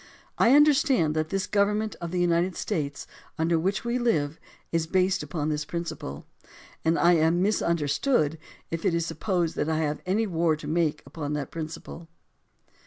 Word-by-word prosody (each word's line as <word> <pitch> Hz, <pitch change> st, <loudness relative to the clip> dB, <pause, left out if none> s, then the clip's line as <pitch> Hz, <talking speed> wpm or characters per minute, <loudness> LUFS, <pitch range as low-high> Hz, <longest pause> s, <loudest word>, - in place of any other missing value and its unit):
I 245 Hz, +4 st, +6 dB
understand 275 Hz, -, +4 dB
that 155 Hz, 0 st, -1 dB
this 195 Hz, +1 st, -1 dB
Government 210 Hz, +1 st, +1 dB
of 170 Hz, -, -4 dB
the 180 Hz, +1 st, -2 dB
United 175 Hz, +1 st, +2 dB
States 145 Hz, -9 st, -3 dB, 0.3 s
under 165 Hz, +1 st, +2 dB
which 195 Hz, +7 st, -1 dB
we 240 Hz, +1 st, 0 dB
live 160 Hz, -11 st, 0 dB, 0.3 s
is 165 Hz, -1 st, 0 dB
based 185 Hz, +2 st, +2 dB
upon 150 Hz, +1 st, -3 dB
this 150 Hz, -1 st, -1 dB
principle; 155 Hz, -, -5 dB, 0.6 s
and 165 Hz, +1 st, +2 dB
I 175 Hz, +1 st, +5 dB
am 165 Hz, +1 st, +3 dB
misunderstood 165 Hz, -, +1 dB, 0.3 s
if 165 Hz, 0 st, -3 dB
it 185 Hz, -4 st, +2 dB
is 170 Hz, -1 st, 0 dB
supposed 175 Hz, -3 st, -1 dB
that 150 Hz, -, 0 dB
I 160 Hz, -, +1 dB
have 150 Hz, -1 st, -1 dB
any 210 Hz, +5 st, +2 dB
war 165 Hz, -4 st, +1 dB
to 150 Hz, -1 st, -9 dB
make 155 Hz, -1 st, 0 dB
upon 150 Hz, -2 st, -5 dB
that 145 Hz, -3 st, -3 dB
principle. 165 Hz, +1 st, -7 dB
165 Hz, 170 wpm, -26 LUFS, 155-190 Hz, 0.6 s, I